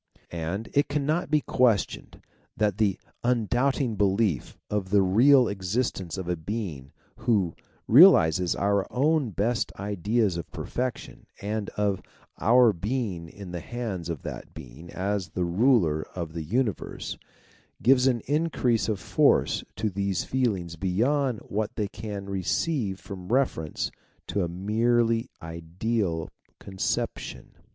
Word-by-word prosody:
And, 85 Hz, +6 st, -3 dB
it 145 Hz, -, +2 dB
cannot 150 Hz, +3 st, 0 dB
be^guestioned 125 Hz, -, +1 dB, 0.3 s
that 105 Hz, -1 st, +1 dB
the 100 Hz, -4 st, +2 dB, 0.2 s
un 120 Hz, -2 st, +2 dB
doubting 125 Hz, 0 st, +1 dB
belief 100 Hz, -, +1 dB
of 100 Hz, -3 st, -2 dB
the 100 Hz, 0 st, +4 dB
real 125 Hz, +7 st, +5 dB
existence 95 Hz, -2 st, -2 dB
.of 95 Hz, -2 st, -5 dB
a 90 Hz, -, 0 dB
Being 80 Hz, -, -5 dB, 0.3 s
who 100 Hz, -8 st, +1 dB, 0.3 s
realizes 110 Hz, -, +7 dB
our 100 Hz, -1 st, 0 dB
own 145 Hz, 0 st, +2 dB
best 115 Hz, +5 st, 0 dB
ideas 100 Hz, 0 st, 0 dB
of 85 Hz, -, -6 dB
perfection, 125 Hz, -1 st, -5 dB
and 105 Hz, 0 st, -3 dB
of 100 Hz, -2 st, +1 dB, 0.4 s
our 115 Hz, +5 st, +5 dB
TSemg^in 95 Hz, -3 st, -4 dB
the 90 Hz, -, -4 dB
hands 100 Hz, -5 st, -5 dB
of 80 Hz, -5 st, -4 dB
that -, -, -7 dB
Being 65 Hz, +8 st, -11 dB
as 100 Hz, 0 st, -2 dB
the 90 Hz, -2 st, -2 dB
ruler 90 Hz, -, +3 dB
of 85 Hz, -3 st, -4 dB
the 85 Hz, -, -4 dB
universe, 105 Hz, -, -2 dB, 0.7 s
gives 130 Hz, +1 st, +5 dB
an 120 Hz, -3 st, +2 dB
increase 130 Hz, -, +1 dB
of 105 Hz, -3 st, -1 dB
force -, -, +2 dB
to 110 Hz, +1 st, -1 dB
these 100 Hz, 0 st, -1 dB
feelings 100 Hz, -10 st, -1 dB
beyond 120 Hz, -, +1 dB
what 105 Hz, +1 st, -3 dB
they 105 Hz, -2 st, -1 dB
can 100 Hz, -1 st, -6 dB
receive 100 Hz, -, -1 dB
from 95 Hz, -3 st, -9 dB
reference 120 Hz, -, 0 dB, 0.4 s
to 100 Hz, -, 0 dB
a 85 Hz, -, -2 dB
nre"fely 115 Hz, +5 st, +1 dB, 0.2 s
ideaT 85 Hz, +2 st, -2 dB, 0.3 s
conception 95 Hz, -1 st, -3 dB
105 Hz, 130 wpm, -27 LUFS, 90-120 Hz, 0.7 s, realizes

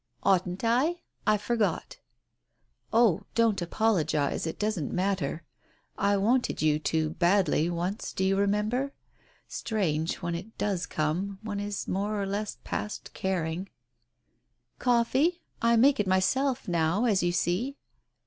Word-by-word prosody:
"Oughtn't 185 Hz, 0 st, +1 dB
I?— 270 Hz, +10 st, +2 dB, 0.3 s
I 215 Hz, 0 st, +5 dB
forgot." 210 Hz, -4 st, -1 dB, 0.9 s
"Oh, 225 Hz, -7 st, +4 dB
don't 230 Hz, -4 st, +3 dB
apologize, 170 Hz, -7 st, +1 dB
it 160 Hz, -, -4 dB
doesn't 210 Hz, -8 st, -1 dB
matter.... 180 Hz, -5 st, -1 dB, 0.5 s
I 200 Hz, 0 st, +2 dB
wanted 240 Hz, +6 st, +1 dB
you 155 Hz, -1 st, +2 dB
to 155 Hz, 0 st, 0 dB
badly, 175 Hz, -1 st, +2 dB
once, 175 Hz, +5 st, -3 dB
do 190 Hz, -, -2 dB
you 190 Hz, +1 st, +3 dB
remember? 210 Hz, +7 st, 0 dB, 0.5 s
Strange, 165 Hz, -8 st, -1 dB
when 170 Hz, -2 st, -4 dB
it 190 Hz, +6 st, -7 dB
does 190 Hz, -4 st, -1 dB
come 175 Hz, +6 st, -1 dB
— -, -, -28 dB
one 205 Hz, -2 st, -3 dB
is 205 Hz, -1 st, -4 dB
more 205 Hz, +2 st, -1 dB
or 200 Hz, -, -1 dB
less 205 Hz, +2 st, -3 dB
past 210 Hz, -, -5 dB
caring 180 Hz, 0 st, -2 dB, 0.6 s
" -, -, -46 dB
"Coffee?" 240 Hz, +1 st, +2 dB
she 355 Hz, -, -10 dB
asked. -, -, -40 dB, 0.2 s
"I 235 Hz, 0 st, +4 dB
make 265 Hz, +3 st, +5 dB
it 205 Hz, -, +1 dB
myself 250 Hz, +9 st, +1 dB
now, 170 Hz, +5 st, +1 dB
as 205 Hz, -5 st, +3 dB
you 175 Hz, 0 st, +1 dB
see!" 200 Hz, +11 st, -1 dB
200 Hz, 145 wpm, -28 LUFS, 175-225 Hz, 0.9 s, I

